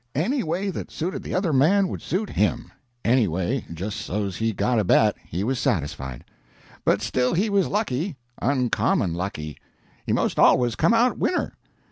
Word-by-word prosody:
Any 240 - +1
way 180 +5 -2
that - - -6
suited 175 +4 -4
the - - -5
other 180 -4 +1
man 185 +9 +4
would - - -5
suit 200 +4 -2
HIM 110 +3 0 0.3
any 120 -2 +4
way 95 +10 -2
just 95 +6 -4
so's 100 -2 -3
he 115 0 0
got 110 +4 +1
a - - +2
bet, 90 - +4
he 90 +4 -3
was 125 +3 -1
satisfied. 70 - -2 0.6
But 100 - +2
still 125 +6 +1
he 205 +5 +1
was 200 -2 +3
lucky, 185 - -1 0.2
uncommon 125 - +1
lucky; 85 -4 -5 0.4
he - - -3
most - - 0
always 120 -2 +5
come 230 - +3
out 240 +2 +2
winner. 360 - 0
125 Hz, 170 wpm, -24 LUFS, -, 0.6 s, always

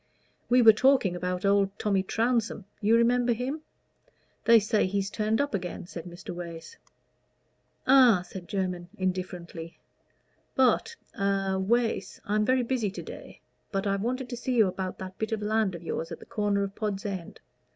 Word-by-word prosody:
"We 245 0 +5
were 220 -1 +9
talking 255 -6 +3
about 180 +2 -2
old 200 0 +2
Tommy 200 -2 +1
Trounsem; 225 0 0 0.2
you 220 +2 +4
remember 240 +1 +3
him? 260 +7 -3 0.8
They 230 -1 +8
say 215 -1 +1
he's 195 +1 -1
turned 215 +1 0
up 285 -2 0
again," 180 -3 -4
said 170 -1 -8
Mr. 175 0 -8
Wace. 170 - -8 1.1
"Ah?" 250 -8 +6
said 175 -1 -9
Jermyn, 180 -3 -3
indifferently. 180 -3 -4 0.8
"But 265 - +3 0.2
a 195 -2 0
Wace 230 +4 0
I'm 210 +1 +1
very 255 +1 +3
busy 235 -4 0
to 195 - -7
day - - -10 0.3
but 195 0 -1
I 200 -1 +1
wanted 245 +6 -2
to 245 - -5
see 250 +1 -2
you 225 -3 +6
about 185 0 -4
that 185 0 -8
bit 220 +1 -2
of 215 -1 -2
land 215 -3 +1
of 170 - -9
yours 165 0 -4
at - - -5
the - - -14
corner 205 -1 0
of 195 0 -4
Pod's 205 -3 -3
End. 190 -4 -5
205 Hz, 170 wpm, -28 LUFS, 185-235 Hz, 1.1 s, were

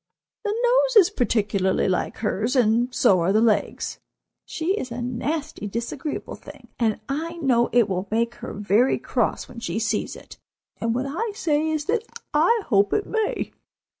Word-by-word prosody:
The 420 -1 -1
nose - - +3
is 400 -6 +7
particularly 205 -7 +1
like 185 -2 -1
hers, 220 +3 -1
and 240 0 +3
so 200 -7 +4
are 170 +3 +2
the 215 - +4
legs. 225 -2 0 0.5
She 335 +4 -1
is 260 - -4
a 235 - -4
nasty, 265 +2 -3
disagreeable 235 +8 -4
thing, - - -13
and 225 -2 +1
I 315 +5 -3
know 260 -8 +2
it 235 -3 +4
will 190 0 -2
make 230 +2 0
her - - -5
very 210 +5 +2
cross - - -1
when 235 - -10
she 185 -4 -3
sees 225 - -1
it, - - -13 0.4
and 230 0 -1
what 255 +2 -1
I 415 +10 -3
say 315 -8 +1
is 310 -2 -1
that 445 +4 +1 0.3
I 375 +9 +3
hope 200 -3 +3
it 420 - +1
may. 440 -1 -1
245 Hz, 170 wpm, -24 LUFS, 220-320 Hz, 0.5 s, is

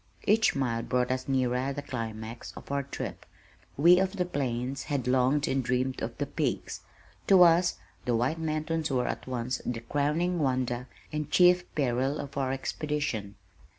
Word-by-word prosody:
Each 220 +1 +4
mile 120 -4 0
brought 125 +1 0
us 130 0 -2
nearer 130 0 +1
the 145 +1 -5
climax 115 -3 -6
of - - -10
our 140 0 +1
trip. 140 - -6 0.5
We 175 +5 +7
of 190 0 +1
the 180 -3 -1
plains 135 -4 -2
had 140 -5 -2
longed 130 +3 +3
and 135 0 0
dreamed 125 +1 -1
of - - -4
the - - -1
peaks. - - -2 0.5
To 190 -2 +8
us 175 +1 +4 0.3
the 120 - +1
White 125 +8 0
Mountains 160 0 -1
were 125 -3 +1
at - - -4
once 125 0 -2
the 120 -2 -3
crowning 150 +8 0
wonder 125 -3 0 0.3
and 150 -1 -2
chief 180 0 +5
peril 135 +1 0
of 140 -1 -7
our 135 -2 0
expedition. 135 -7 -3
135 Hz, 165 wpm, -29 LUFS, 125-155 Hz, 0.5 s, To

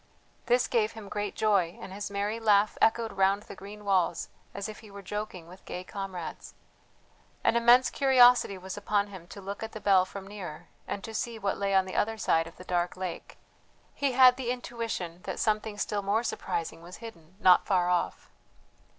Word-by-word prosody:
This 245 +1 +3
gave 220 -3 +1
him 220 -3 -10
great 205 -1 -3
joy, 195 -6 +2
and 190 - -8
his 205 +1 -5
merry 205 +3 -2
laugh 210 -2 +3
echoed 225 0 +3
round 195 +1 +2
the - - -10
green 205 +2 -11
walls 185 -4 +1 0.2
as 200 +1 -5
if 215 - -8
he 220 - -14
were 200 0 -10
joking 195 -3 -5
with 185 +2 -14
gay 180 - -6
comrades. 190 -3 -7 0.9
An - - +3
immense 240 +2 +6
curiosity 250 -6 +5
was 185 0 -7
upon 205 0 0
him 185 -4 -11
to 200 - -10
look 200 +1 -6
at 220 0 -6
the 215 - -6
bell 195 -3 +4
from 195 +1 -9
near, 195 -6 -8 0.2
and 200 - -4
to 225 - -7
see 230 +1 -3
what 200 -2 -2
lay 200 -1 +1
on 190 -1 +4
the 185 - -7
other 225 +1 0
side 165 -5 +1
of 165 - -12
the 185 - -10
dark 175 -1 -1
lake. 185 -2 -6 0.6
He 280 -2 0
had 255 -1 +7
the 255 -3 -3
intuition 230 -8 -4
that - - -4
something 215 -1 0
still 205 0 -1
more 205 +4 +1
surprising 165 -7 -3
was 175 +2 -10
hidden 185 -7 -12
not 185 -3 +5
far 180 -3 +2
off. 180 -1 -1
200 Hz, 195 wpm, -29 LUFS, 185-220 Hz, 0.9 s, had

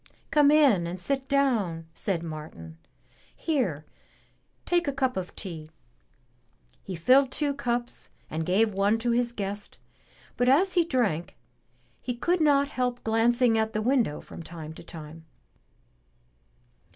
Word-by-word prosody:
"Come 295 -2 +5
in 275 - +4
and 180 +2 -5
sit 265 +7 -2
down," 225 -13 +1
said 170 -1 -2
Martin. 150 - -8 0.6
"Here, 200 - -1 0.8
take 345 -2 +1
a - - +2
cup 265 -2 -1
of 185 -1 -5
tea." 160 -6 -7 1.1
He 190 - -6
filled 255 - +4
two 290 0 0
cups 245 -3 -3 0.2
and 160 +1 -3
gave 205 +5 +2
one 200 +3 +2
to 235 +1 -1
his 240 0 +1
guest, 205 -2 -5 0.6
but 245 0 +3
as 365 +8 +4
he 350 - +4
drank, 230 - -1 0.6
he 245 - -3
could 345 +8 0
not 285 -2 +4
help 250 -3 -2
glancing 225 +1 +3
at 220 0 -1
the 215 - -1
window 235 - +1
from - - -10
time 160 -2 -8
to - - -11
time. 160 -1 -10
225 Hz, 140 wpm, -27 LUFS, 170-270 Hz, 1.1 s, Come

